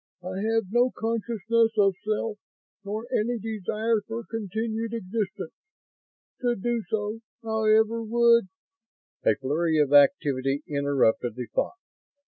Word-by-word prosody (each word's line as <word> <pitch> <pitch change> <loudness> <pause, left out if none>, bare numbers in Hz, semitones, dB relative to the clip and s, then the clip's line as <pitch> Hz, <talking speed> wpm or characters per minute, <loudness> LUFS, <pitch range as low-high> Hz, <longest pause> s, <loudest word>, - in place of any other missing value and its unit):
I 185 +2 -4
have 225 -4 0
no 240 +2 +4
consciousness 225 0 0
of 200 -2 +4
self 215 0 -2 0.4
nor 210 +3 -4
any 240 +2 +1
desire 220 +1 -1
for 230 +1 -4
continued 225 +1 -3
existence. 205 -4 -4 0.9
To 245 -1 +1
do 235 +3 -1
so, 215 +1 -2 0.2
however, 220 0 +2
would 235 -1 +4 0.4
..." - - -59
A - - +5
flurry 155 +4 0
of 145 -2 +2
activity 140 -2 +4
interrupted 140 -5 +1
the 125 - -4
thought. - - 0
215 Hz, 120 wpm, -26 LUFS, 180-230 Hz, 0.9 s, A